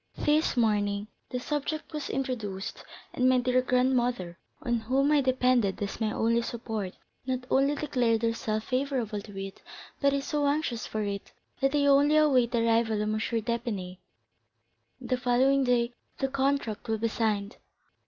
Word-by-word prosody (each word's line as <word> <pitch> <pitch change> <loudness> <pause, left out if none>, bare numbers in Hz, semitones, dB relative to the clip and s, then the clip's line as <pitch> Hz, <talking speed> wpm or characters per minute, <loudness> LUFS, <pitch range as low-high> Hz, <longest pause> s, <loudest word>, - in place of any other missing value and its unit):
This 300 -2 +2
morning 205 -2 +1 0.2
the 250 - -3
subject 295 +4 -3
was 300 -2 -4
introduced, 225 -8 -4 0.3
and 255 0 +3
my 255 - +4
dear 250 0 +2
grandmother, 250 -8 +1 0.2
on 240 -3 0
whom 265 +6 +1
I 295 -1 +5
depended 255 -6 +2
as 205 +2 -4
my 215 -1 +1
only 230 +2 +2
support, 225 -5 -4 0.3
not 255 -1 -1
only 275 +2 +3
declared 245 -6 0
herself 220 -1 -1
favorable 255 -5 -1
to 200 -1 -11
it, 195 0 -7 0.4
but 280 -1 +4
is 280 0 -1
so 295 -1 0
anxious 280 -5 -1
for 215 -1 -2
it, 200 -1 -4 0.3
that 270 +1 +2
they 285 -1 +3
only 285 +2 +5
await 265 -6 +4
the 235 -1 +1
arrival 225 -1 +2
of 210 0 0
M. 215 - 0
d'Épinay, 220 -5 -2 1.0
and - - -10
the 255 - +2
following 260 +3 +3
day 240 -1 +2 0.2
the 270 - -1
contract 270 -4 -1
will 220 - +1
be 230 +2 0
signed." 215 -2 -1
245 Hz, 165 wpm, -28 LUFS, 220-270 Hz, 1.0 s, I